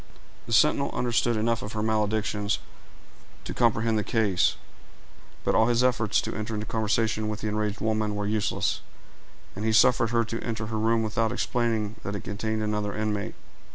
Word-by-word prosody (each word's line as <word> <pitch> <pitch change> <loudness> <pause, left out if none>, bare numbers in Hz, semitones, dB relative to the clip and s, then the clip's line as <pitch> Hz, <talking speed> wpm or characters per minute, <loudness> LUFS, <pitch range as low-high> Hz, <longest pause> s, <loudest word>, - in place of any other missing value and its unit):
The - - -7
sentinel - - +4
understood 120 -1 +1
enough 115 +1 +1
of 105 - -6
her 105 -1 -2
maledictions 105 -1 0 0.9
to - - -5
comprehend 115 -2 +2
the - - -1
case; 105 -4 +2 0.9
but - - +1
all 110 - +4
his 120 0 +3
efforts 120 -5 +2
to - - -4
enter 110 +1 -3
into 105 0 -3
conversation 110 0 0
with 105 0 -4
the - - -2
enraged 105 0 -2
woman 110 -1 0
were 105 0 -2
useless, 105 -2 0 0.7
and 100 - -5
he 110 - +2
suffered 115 +1 +5
her 115 0 +2
to 115 0 -4
enter 110 -2 -3
her 110 0 -3
room 115 +1 +2
without 110 +1 0
explaining 115 -3 -1
that 100 - -4
it 100 - -5
contained 110 +2 -2
another 105 -1 -1
inmate. 105 -1 -2
110 Hz, 175 wpm, -27 LUFS, 105-115 Hz, 0.9 s, suffered